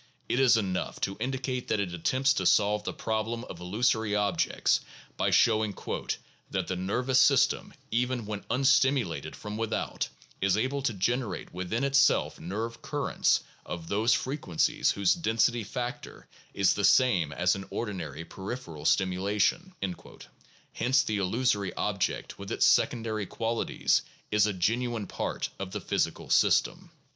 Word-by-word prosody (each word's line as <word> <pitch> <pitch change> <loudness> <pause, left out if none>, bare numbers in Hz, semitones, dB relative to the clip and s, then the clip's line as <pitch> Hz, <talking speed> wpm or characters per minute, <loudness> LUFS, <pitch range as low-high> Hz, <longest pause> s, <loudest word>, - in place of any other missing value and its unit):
It 120 - 0
is 130 -4 +6
enough 95 -4 -2
to 95 - -1
indicate 130 +1 -3
that 110 - 0
it 95 -3 -2
attempts 130 +11 +2
to - - 0
solve 105 0 +3
the - - -1
problem 110 +2 -2
of 90 - -9
illusory 105 +3 +1
objects 105 -1 +1 0.3
by - - +1
showing 110 -3 +3 0.7
"that - - -1
the 95 - -3
nervous 125 +8 +1
system, 140 -1 +3 0.2
even 125 0 0
when 105 -1 -5
unstimulated 135 0 +2
from 105 0 -6
without, 115 -1 -2 0.3
is 95 0 +2
able 130 +5 -1
to 130 -4 0
generate 115 +1 -2
within 90 +7 -2
itself 140 0 +3
nerve 110 +7 -4
currents - - +1 0.2
of 85 -2 -7
those 110 +4 +3
frequencies 130 - 0
whose 100 -2 +3
density 120 -6 +1
factor 120 +4 -6 0.3
is 100 -2 +4
the 100 - -3
same 95 - +4
as 85 +5 +2
in 95 0 -6
ordinary 90 - -5
peripheral 95 - -7
stimulation 100 - +1
(p. 100 - 0
352); - - -15 0.4
hence 130 +4 +2
the 105 -2 -1
illu 105 +7 -1
sory 100 -5 +1
object - - -2
with 100 - -7
its - - +3
secondary 110 -4 +2
qualities 115 0 0 0.3
is 105 -1 +4
a 105 - -1
genuine 115 +4 0
part - - -3
of 95 -1 -4
the 105 +2 -4
physical - - -1
system. - - +2
110 Hz, 150 wpm, -28 LUFS, 95-125 Hz, 0.7 s, is